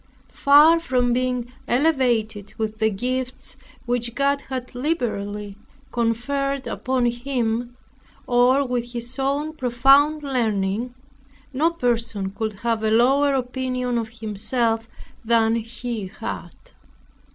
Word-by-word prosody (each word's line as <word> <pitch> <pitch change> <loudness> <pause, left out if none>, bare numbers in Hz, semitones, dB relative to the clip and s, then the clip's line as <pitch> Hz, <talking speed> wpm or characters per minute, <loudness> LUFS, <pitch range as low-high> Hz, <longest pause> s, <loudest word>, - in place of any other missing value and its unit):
Far 300 +4 +6
from 250 -6 +1
being 250 -1 -1
elevated 240 -7 +1
with 220 -1 -3
the 220 0 +3
gifts 255 +6 -3 0.3
which 240 -1 -1
God 280 0 +1
had 255 -1 -5
liberally 210 -8 -3 0.3
conferred 270 +4 -1
upon 255 -1 -1
him, 240 -1 -1 0.5
or 250 +3 +4
with 245 -1 -3
his 240 +3 -3
own 285 +3 -1
profound 275 +4 +4
learning, 230 -3 -1 0.6
no 305 +6 +3
person 230 -10 -1
could 220 +1 -3
have 230 -2 0
a 220 - +1
lower 270 +5 +4
opinion 255 -1 -1
of 225 -1 -4
himself 225 +1 -2 0.3
than 225 0 +3
he 230 -2 -5
had. - - -7
245 Hz, 110 wpm, -23 LUFS, 225-265 Hz, 0.6 s, Far